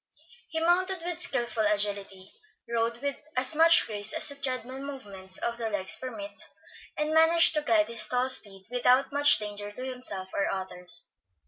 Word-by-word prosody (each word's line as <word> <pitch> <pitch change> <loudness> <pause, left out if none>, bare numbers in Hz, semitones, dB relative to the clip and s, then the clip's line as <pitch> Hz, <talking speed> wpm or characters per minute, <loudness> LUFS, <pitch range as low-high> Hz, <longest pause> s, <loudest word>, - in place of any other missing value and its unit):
He 320 - -3
mounted 355 +2 0
with 350 -1 -1
skilful 240 -9 -2
agility, 200 -2 -2 0.3
rode 235 +1 -2
with 280 -1 -2 0.2
as 255 +3 +3
much 330 +2 +6
grace 210 -1 -7
as - - -1
the 280 - -7
tread 255 -4 -3
mill 260 +2 -9
movements 200 -9 -7
of 235 0 -4
the 225 -1 -3
legs 195 -3 +1
permit, 300 +4 -7 0.6
and 300 +1 -1
managed 325 +1 +5
to 305 - 0
guide 220 -6 +2
his 230 -1 +4
tall 250 +1 0
steed 200 -7 -1
without 250 +2 +2
much 290 +1 +5
danger 205 -1 -7
to 250 +5 -8
himself 250 -8 -2
or 200 - -1
others. 180 -2 0
245 Hz, 175 wpm, -27 LUFS, 205-285 Hz, 0.6 s, much